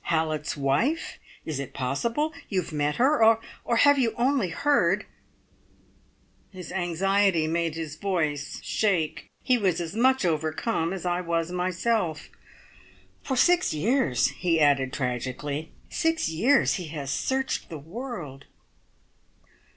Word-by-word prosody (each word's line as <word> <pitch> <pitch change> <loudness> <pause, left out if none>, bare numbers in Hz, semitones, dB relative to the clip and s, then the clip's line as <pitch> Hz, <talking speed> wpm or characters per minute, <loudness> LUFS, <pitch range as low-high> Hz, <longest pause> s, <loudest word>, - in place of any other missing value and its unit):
Hallett's 155 -2 -1
wife? 145 - 0 0.3
Is 155 -4 -3
it 140 - -6
possible? 230 - -1 0.2
You 185 -3 0
have - - -10
met 150 0 0
her; 260 0 +3 0.4
or 235 - 0
have 285 +4 +5
you 235 -4 +1
only 250 -5 +1
heard 285 - +2 0.7
" - - -35 0.7
His 180 -3 -9
anxiety 190 0 +1
made 165 0 -1
his 160 -2 -5
voice 155 -6 -2
shake. 165 -8 0
He 250 -1 +3
was 185 -5 +1
as 170 +2 -5
much 260 0 +3
overcome 160 +3 -1
as 190 -2 -5
I 175 0 0
was 170 -1 -1
myself. 180 -1 -1 0.9
"For 265 - -2
six 355 - +3
years," 205 - +2
he 170 -3 0
added 140 -3 +3
tragically 130 +4 -3 0.2
"six 325 -1 +1
years 235 - +3
he - - -6
has 145 -3 -5
searched 265 - -1
the 160 - -6
world 165 - -7
175 Hz, 130 wpm, -26 LUFS, 155-235 Hz, 0.9 s, have